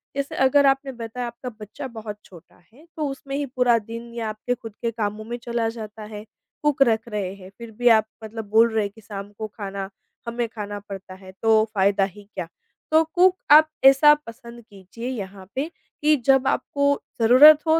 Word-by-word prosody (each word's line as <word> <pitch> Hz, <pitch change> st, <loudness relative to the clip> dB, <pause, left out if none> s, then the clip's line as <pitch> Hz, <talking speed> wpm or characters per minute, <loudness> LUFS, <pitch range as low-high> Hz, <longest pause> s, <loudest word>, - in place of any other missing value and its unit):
जैसे 280 Hz, 0 st, -3 dB
अगर 275 Hz, +2 st, +4 dB
आपने 270 Hz, 0 st, +1 dB
बताया 240 Hz, +1 st, -5 dB
आपका 240 Hz, +2 st, -7 dB
बच्चा 210 Hz, +5 st, -7 dB
बहुत 215 Hz, -2 st, -7 dB
छोटा 175 Hz, -1 st, -17 dB
है, 285 Hz, +8 st, -19 dB
तो 305 Hz, -2 st, -1 dB
उसमें 275 Hz, 0 st, -6 dB
ही 285 Hz, 0 st, -1 dB
पूरा 250 Hz, -2 st, +2 dB
दिन 230 Hz, +2 st, -9 dB
या 230 Hz, -2 st, -3 dB
आपके 215 Hz, +3 st, -3 dB
खुद 225 Hz, -2 st, -10 dB
के 235 Hz, -, -1 dB
कामों 215 Hz, -1 st, -3 dB
में 240 Hz, +2 st, -5 dB
चला 235 Hz, -1 st, -1 dB
जाता 220 Hz, -1 st, -8 dB
है, 210 Hz, 0 st, -7 dB, 0.4 s
कुक 295 Hz, -2 st, +1 dB
रख 225 Hz, -3 st, +3 dB
रहे 205 Hz, -4 st, -3 dB
हैं 190 Hz, -1 st, -13 dB
फिर 235 Hz, -1 st, -9 dB
भी 245 Hz, -, +2 dB
आप 220 Hz, -2 st, +5 dB, 0.2 s
मतलब 220 Hz, 0 st, -6 dB
बोल 225 Hz, +2 st, +5 dB
रहे 220 Hz, -1 st, +2 dB
हैं 200 Hz, -, -4 dB
कि 220 Hz, -, -15 dB
शाम 200 Hz, -1 st, -8 dB
को 220 Hz, -, -3 dB
खाना 195 Hz, -2 st, -5 dB, 0.4 s
हमें 235 Hz, 0 st, -2 dB
खाना 205 Hz, -2 st, -6 dB
पड़ता 195 Hz, -1 st, -8 dB
है, 190 Hz, 0 st, -13 dB
तो 220 Hz, -1 st, +4 dB
फ़ायदा 195 Hz, 0 st, +3 dB
ही 195 Hz, +2 st, -5 dB
क्या? 180 Hz, -3 st, -4 dB, 0.4 s
तो 315 Hz, +1 st, +5 dB
कुक 365 Hz, +1 st, +5 dB, 0.2 s
आप 310 Hz, +1 st, +8 dB, 0.2 s
ऐसा 275 Hz, +3 st, +8 dB
पसंद 235 Hz, 0 st, -11 dB
कीजिए 200 Hz, +4 st, -9 dB
यहाँ 195 Hz, -6 st, -7 dB
पे, 280 Hz, +5 st, -2 dB, 0.3 s
कि 305 Hz, +1 st, +4 dB
जब 270 Hz, -1 st, +4 dB
आपको 280 Hz, 0 st, +1 dB, 0.2 s
ज़रूरत 275 Hz, +7 st, +8 dB
हो, 320 Hz, +1 st, +4 dB
230 Hz, 200 wpm, -23 LUFS, 210-270 Hz, 0.4 s, आप